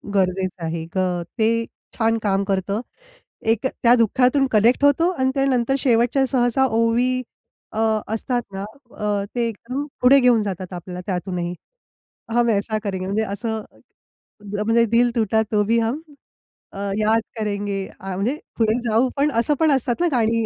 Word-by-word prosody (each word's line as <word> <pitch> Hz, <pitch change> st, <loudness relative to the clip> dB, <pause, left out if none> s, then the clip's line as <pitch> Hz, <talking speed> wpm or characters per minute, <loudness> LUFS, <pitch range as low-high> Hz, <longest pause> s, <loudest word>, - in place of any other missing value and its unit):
गरजेचं 185 Hz, -2 st, 0 dB
आहे. 160 Hz, 0 st, -3 dB
ग 180 Hz, -2 st, 0 dB, 0.2 s
ते 230 Hz, +1 st, +2 dB, 0.3 s
छान 225 Hz, -1 st, +2 dB
काम 195 Hz, -1 st, +1 dB
करतं. 195 Hz, +3 st, -1 dB, 0.6 s
एक 225 Hz, +3 st, +1 dB
त्या 240 Hz, -1 st, +3 dB
दुःखातून 250 Hz, +4 st, +3 dB
कनेक्ट 230 Hz, +5 st, +3 dB
होतो 330 Hz, +5 st, +4 dB
आणि 260 Hz, -7 st, 0 dB
त्यानंतर 270 Hz, -2 st, +1 dB
शेवटच्या 245 Hz, +2 st, +2 dB
सहसा 255 Hz, 0 st, +2 dB
ओवी 240 Hz, +2 st, +1 dB, 0.5 s
अ 220 Hz, -, -3 dB, 0.3 s
असतात 245 Hz, +2 st, -1 dB
ना, 195 Hz, +1 st, -4 dB, 0.3 s
अ, 205 Hz, -1 st, -1 dB
ते 235 Hz, -1 st, +1 dB
एकदम 250 Hz, +6 st, -5 dB, 0.2 s
पुढे 265 Hz, +3 st, +7 dB
घेऊन 245 Hz, -3 st, +4 dB
जातात 185 Hz, -2 st, -5 dB
आपल्याला 180 Hz, +1 st, -7 dB
त्यातूनही. 180 Hz, -2 st, -3 dB, 0.8 s
हम 240 Hz, 0 st, +3 dB
ऐसा 215 Hz, +1 st, 0 dB
करेंगे 190 Hz, -3 st, -3 dB
म्हणजे 215 Hz, +3 st, 0 dB
असं 220 Hz, +2 st, -3 dB, 1.0 s
म्हणजे 230 Hz, +1 st, +4 dB
दिल 240 Hz, +1 st, +4 dB
टूटा 220 Hz, -1 st, +2 dB
तो 210 Hz, -1 st, +3 dB
भी 230 Hz, +2 st, +2 dB
हम 235 Hz, +7 st, -1 dB, 0.7 s
अ, 195 Hz, -, -8 dB, 0.2 s
याद 220 Hz, +1 st, +3 dB, 0.2 s
करेंगे. 205 Hz, -2 st, -2 dB, 0.2 s
अ 190 Hz, 0 st, -5 dB
म्हणजे 235 Hz, +10 st, -1 dB, 0.2 s
पुढे 225 Hz, +1 st, +2 dB
जाऊ 230 Hz, +4 st, +3 dB
पण 285 Hz, +2 st, +2 dB
असं 240 Hz, +6 st, +2 dB
पण 315 Hz, -2 st, +4 dB
असतात 255 Hz, +2 st, 0 dB
ना 350 Hz, -, +3 dB
गाणी 230 Hz, -3 st, +1 dB
225 Hz, 155 wpm, -22 LUFS, 200-250 Hz, 1.0 s, पुढे